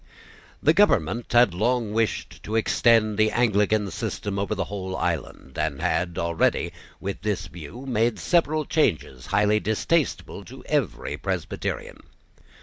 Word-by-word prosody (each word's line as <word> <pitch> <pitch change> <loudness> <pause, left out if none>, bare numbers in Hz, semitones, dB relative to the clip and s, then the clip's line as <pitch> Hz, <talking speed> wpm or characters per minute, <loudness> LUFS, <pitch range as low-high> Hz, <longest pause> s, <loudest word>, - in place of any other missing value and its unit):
The 155 - +5
government 120 - +2
had 120 -5 +5
long 110 +3 0
wished 115 0 -1
to 110 - -4
extend 110 -1 +3
the 110 0 +5
Anglican 105 -3 +2
system 100 0 -3
over 100 +2 -1
the 100 - -1
whole 95 -1 -5
island, 65 - -3
and 70 -3 -1
had 85 +1 -1
already, 85 -1 +1 0.3
with 100 0 -5
this 100 -4 -1
view, 85 - -9
made 120 -2 +1
several 155 -3 +1
changes 75 - 0
highly 105 +1 +3
distasteful 130 +9 -1
to - - -12
every - - -1
Presbyterian. - - -4
105 Hz, 135 wpm, -25 LUFS, 95-120 Hz, 0.3 s, The